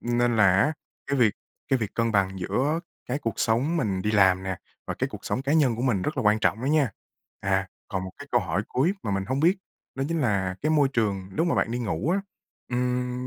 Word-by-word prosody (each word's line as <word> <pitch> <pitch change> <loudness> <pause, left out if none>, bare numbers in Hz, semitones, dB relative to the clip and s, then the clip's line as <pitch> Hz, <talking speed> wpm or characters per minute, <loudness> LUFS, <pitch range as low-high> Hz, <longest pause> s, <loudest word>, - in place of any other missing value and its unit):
Nên 120 0 +1
là 100 -3 +6
á, 155 - +2 0.3
cái 140 -1 0
việc 110 -4 +4 0.3
cái 135 - +3
việc 105 -4 -4
cân 115 -1 +1
bằng 95 -1 +1
giữa 145 - 0 0.3
cái 130 +4 -1
cuộc 115 -5 -2
sống 125 +9 +2
mình 100 - 0
đi 105 - 0
làm 95 -3 +4
nè, 95 -1 -3 0.3
và - - -3
cái - - -1
cuộc - - -10
sống 130 - -1
cá 140 - 0
nhân 140 -7 +3
của 120 - -3
mình 120 -8 +1
rất - - -2
là - - 0
quan 105 0 +4
trọng 110 +1 +1
đó 130 - -3
nha. 145 -4 +3 0.5
À, 95 -1 0 0.2
còn 95 -1 -2
một 95 - -6
cái 145 - -9
câu 120 - +4
hỏi 95 +1 -1
cuối 155 +9 +2
mà - - -2
mình 95 0 0
hông 130 +4 -1
biết 175 +5 +4 0.4
đó 135 +1 -2
chính 165 -1 0
là 100 -7 +1
cái 155 - +1
môi 150 -3 +4
trường 100 -7 -1
lúc 165 - +2
mà 170 - +2
bạn - - +1
đi 120 - -2
ngủ 115 - -1
á, 195 - +2 0.5
ừm, 125 0 -1
120 Hz, 250 wpm, -26 LUFS, 100-135 Hz, 0.5 s, là